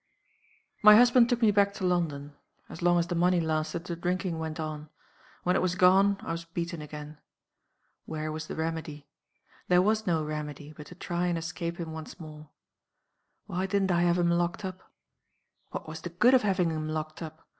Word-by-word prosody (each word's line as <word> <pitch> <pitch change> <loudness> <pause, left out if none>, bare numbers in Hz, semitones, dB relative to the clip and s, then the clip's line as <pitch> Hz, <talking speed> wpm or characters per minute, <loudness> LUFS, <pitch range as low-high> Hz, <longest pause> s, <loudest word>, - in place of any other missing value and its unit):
"My 210 -1 +9
husband 240 +1 +6
took 240 -1 0
me 215 - +6
back 200 0 +2
to 190 - -3
London. 150 -5 -1 0.4
"As 165 - -9
long 175 0 +4
as 170 - +2
the 175 - -4
money 175 +1 +3
lasted, 160 +1 -1
the 175 - -4
drinking 175 0 -2
went 160 0 -5
on. 155 -1 -5 0.5
When 180 +1 +2
it - - +2
was 180 -1 0
gone, 190 +2 +5
I - - -5
was 165 0 -4
beaten 170 0 -5
again. 150 0 -9 0.9
Where 155 -1 -4
was 155 0 -5
the - - -6
remedy? 160 -2 -4 0.6
There 180 0 +5
was 215 +1 +1
no 165 -3 +1
remedy, 150 -1 -6
but 150 - -11
to 180 - -12
try 175 0 -2
and 175 -1 0
escape 170 0 -4
him 165 -2 -5
once 160 +2 -8
more. 155 -2 -11 1.0
Why 185 +2 -2
didn't 195 -1 +1
I 175 -1 +2
have 175 0 +3
him 170 -1 +2
locked 175 +3 0
up? 185 0 -8 0.8
What - - -6
was 160 0 -7
the 175 - -5
good 215 +10 +4
of 260 - +6
having 185 -5 +1
him 155 -1 -3
locked 155 0 -4
up? 160 -1 -9
170 Hz, 195 wpm, -28 LUFS, 155-180 Hz, 1.0 s, My